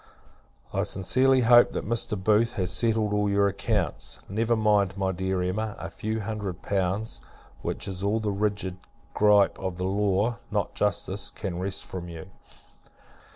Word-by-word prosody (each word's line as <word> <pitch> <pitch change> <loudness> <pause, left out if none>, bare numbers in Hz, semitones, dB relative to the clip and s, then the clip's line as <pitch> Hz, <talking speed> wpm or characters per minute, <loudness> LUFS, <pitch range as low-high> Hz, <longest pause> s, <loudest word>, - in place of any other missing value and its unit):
I - - +1
sincerely 130 +7 +2
hope, 120 0 +6
that - - -3
Mr. 110 -2 0
Booth 110 +5 +2
has 90 -4 -1
settled 110 +4 +1
all 105 0 +1
your 100 0 +3
accounts. 100 - -2
Never 115 +4 +1
mind, 105 -3 +2
my 95 -1 0
dear 95 0 -1
Emma, 105 +4 -2
a 85 +2 -7
few 110 +6 -3
hundred 100 -4 -5
pounds; 100 +3 -1 0.4
which - - -3
is 95 -1 -5
all 100 +3 +1
the 105 -2 -1
rigid 100 -2 -2 0.3
gripe 105 -2 +4
of 95 -2 -4
the 90 - -3
law, 100 +3 +1
not - - -1
justice, - - -1
can 90 -2 -5
wrest 95 +1 -2
from 90 -2 -7
you. 85 +3 -9
100 Hz, 155 wpm, -27 LUFS, 95-110 Hz, 0.4 s, hope